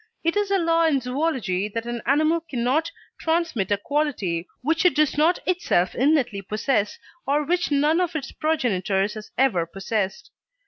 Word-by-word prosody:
It 335 +2 +1
is 415 -1 +1
a 395 - +3
law 330 -1 +2
in 285 -4 +2
zoology 250 - -1
that 230 +2 -4
an 240 -1 -4
animal 310 +4 +3
cannot 265 +6 0 0.3
transmit 320 - 0
a 205 - +2
quality 205 - -1 0.2
which 320 +4 +1
it 360 - +4
does 305 -1 +2
not 320 +4 +3
itself 345 - +1
innately 265 -7 +1
possess, 210 +2 -1 0.3
or 290 +2 +2
which 355 +3 0
none 300 +4 +2
of 345 -2 -2
its 280 -4 -4
progenitors 205 - 0
has 215 -1 -9
ever 205 -11 +2
possessed. 195 - -3
275 Hz, 165 wpm, -24 LUFS, 210-320 Hz, 0.3 s, it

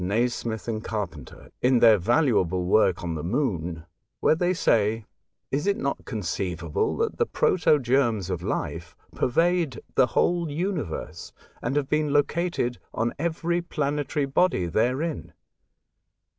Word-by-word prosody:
Nasmyth 115 +3 -1
and 110 -1 -3
Carpenter, 90 - -6
in 125 0 +4
their 115 -3 +6
valuable 100 - +2
work 95 -2 +3
on 85 -1 -2
the 75 -2 -4
Moon, 90 - -2 0.3
where - - +4
they 175 +3 +1
say, 110 - +1 0.5
''Is 145 +7 -1
it 200 - +2
not 140 - -3
conceivable 90 -5 -2
that - - -1
the - - +2
protogerms 130 - +2
of - - -2
life 85 +2 -4 0.2
pervade 165 +1 +1
the 130 - +4
whole 175 -2 +2
universe, 155 - -4 0.3
and 125 +4 -2
have 145 -2 +1
been 150 0 0
located 145 -4 0 0.2
on 115 +1 0
every 170 +2 -1
planetary 150 -3 -1
body 135 - +2
therein 130 - -1
125 Hz, 130 wpm, -25 LUFS, 100-150 Hz, 0.5 s, their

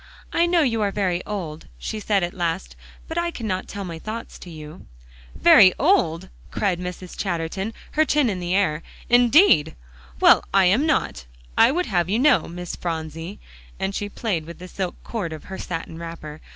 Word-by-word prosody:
"I 340 +1 +3
know 345 -1 +3
you 230 -5 0
are 205 - +2
very 185 -3 -1
old," 165 - -5
she 215 - -5
said 205 -3 +1
at 175 - -2
last, 170 0 -3 0.3
"but 325 +1 -2
I 340 0 0
cannot 215 - -4
tell 200 - -6
my 165 -2 -6
thoughts 220 +6 -7
to 180 - -11
you." 155 +1 -11 0.5
"Very 185 -1 +7
old!" 185 - +2 0.2
cried 190 -4 -1
Mrs. 180 0 -7
Chatterton, 185 +3 -3 0.2
her 310 - +3
chin 295 -3 +2
in 195 -5 -2
the 175 +1 -1
air. 170 -6 +1 0.3
"Indeed! 245 - +5 0.4
well, - - +6
I 195 -1 +4
am 230 - +3
not, 275 - 0 0.3
I - - +6
would 360 +5 0
have 175 -4 0
you 210 - +1
know, 280 +2 +4
Miss 175 +1 -6
Phronsie," 165 +2 -5 0.4
and 195 +1 -2
she 205 +1 -3
played 195 -7 -3
with 170 - -9
the 180 - -10
silk 185 0 -4
cord 205 -8 -4
of 155 - -9
her 190 - -8
satin 165 -1 -6
wrapper. 165 -2 -8
185 Hz, 185 wpm, -23 LUFS, 170-220 Hz, 0.5 s, Very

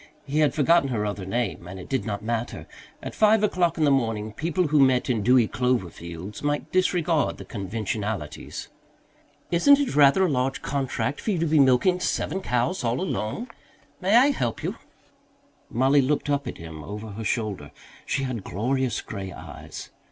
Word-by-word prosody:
He 145 +2 -1
had 150 -2 +3
forgotten 160 -1 +4
her 110 -4 -1
other 100 -2 -4
name, 95 -4 -2
and 95 +1 -8
it 90 - -9
did 135 -2 -1
not 105 -1 -4
matter; 115 +1 -3 0.4
at - - -5
five 215 0 +4
o'clock 180 -5 +1
in 160 - +1
the 145 - +4
morning 110 -5 0
people 165 +4 -1
who 150 0 +3
met 130 -2 +4
in 115 -3 0
dewy 120 +1 +4
clover 120 -6 0
fields 85 +5 -8
might 145 0 -2
disregard 175 -4 +1
the - - -9
conventionalities. 105 -4 -4 0.8
"Isn't 280 +12 +6
it 280 - -1
rather 145 +6 +6
a - - +2
large 135 -3 -1
contract 140 0 -2
for - - -3
you 195 - +1
to 165 - +1
be 155 -1 +3
milking 135 +7 +4
seven 190 +1 -1
cows 125 +5 0
all 120 +1 0
alone? 185 - -3 0.5
May 195 +4 +3
I 265 +4 +6
help 120 - -2
you?" - - -2 0.9
Mollie 135 +4 +3
looked 145 +2 0
up 140 0 0
at - - -5
him 80 -2 -9
over 105 +5 -7
her 110 +2 -6
shoulder. 105 - -2 0.3
She 135 - -1
had 125 -6 -3
glorious 125 +7 -1
grey 95 -3 -6
eyes. - - -9
130 Hz, 180 wpm, -25 LUFS, 105-155 Hz, 0.9 s, Isn't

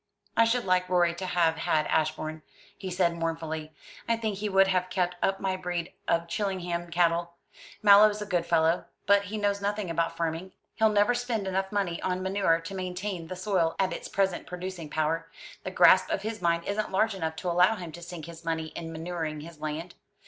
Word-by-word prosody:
"I 230 - +5
should 240 0 +1
like 185 -1 +2
Rorie 175 -2 +3
to 185 +2 -5
have 165 -2 +2
had 155 -1 +1
Ashbourne," 155 0 -1 0.3
he 190 - -6
said 175 -1 +2
mournfully. 160 -2 -3 0.4
"I 230 - +3
think 215 -3 -3
he 210 0 -1
would 195 0 +5
have 185 -1 +1
kept 180 -1 0
up 195 0 +1
my 190 -1 -1
breed 175 -2 -4
of 170 0 +1
Chillingham 175 -3 -2
cattle. 170 0 +1 0.5
Mallow's 210 +1 +7
a 210 - -4
good 175 -4 0
fellow, 165 +1 +2 0.2
but 200 0 +4
he 210 +2 -4
knows 200 -1 0
nothing 205 -2 -2
about 165 0 -1
farming. 165 +3 -3 0.2
He'll 220 0 +3
never 210 +3 +3
spend 240 -4 -2
enough 190 0 -1
money 195 -5 -1
on 185 0 -1
manure 190 -3 +2
to 165 +4 -7
maintain 185 -1 -4
the 185 - -5
soil 185 -3 0
at 190 -1 +1
its - - -6
present 195 -2 0
producing 180 -3 -6
power. 160 +2 -1 0.3
The - - -3
grasp - - +6
of - - -1
his 220 -2 -4
mind 170 -1 +1
isn't 210 +1 -2
large 215 +3 +2
enough 160 -4 -3
to 175 +2 -2
allow 180 +5 +4
him 175 -5 -7
to 175 - -10
sink 170 -2 -8
his 165 0 -11
money 160 -1 -2
in 165 0 -7
manuring 160 -2 -4
his 160 0 -11
land. 155 +3 -4
180 Hz, 200 wpm, -28 LUFS, 165-195 Hz, 0.5 s, Mallow's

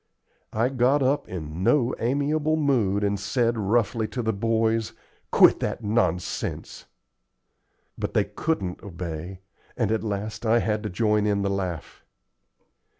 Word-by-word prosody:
I 115 +3 +1
got 135 +2 +2
up 135 +3 +1
in 80 -2 -6
no 125 +3 +3
amiable 145 +5 +1
mood 120 -10 +1
and 100 -1 0
said, 115 +4 +1
roughly, 110 +1 +1
to 125 - -4
the 110 0 0
boys, 115 +1 0 0.4
"Quit - - +6
that - - -3
nonsense." 95 -5 -2 1.1
But - - -3
they - - +4
couldn't 95 - -2
obey, 90 -1 -6 0.4
and 110 -4 +1
at 110 - +1
last 105 +1 -4
I 115 0 +3
had 110 -2 0
to 105 - -4
join 105 +1 +1
in 100 -1 +1
the 100 - 0
laugh. 95 -4 -4
110 Hz, 140 wpm, -25 LUFS, 100-120 Hz, 1.1 s, Quit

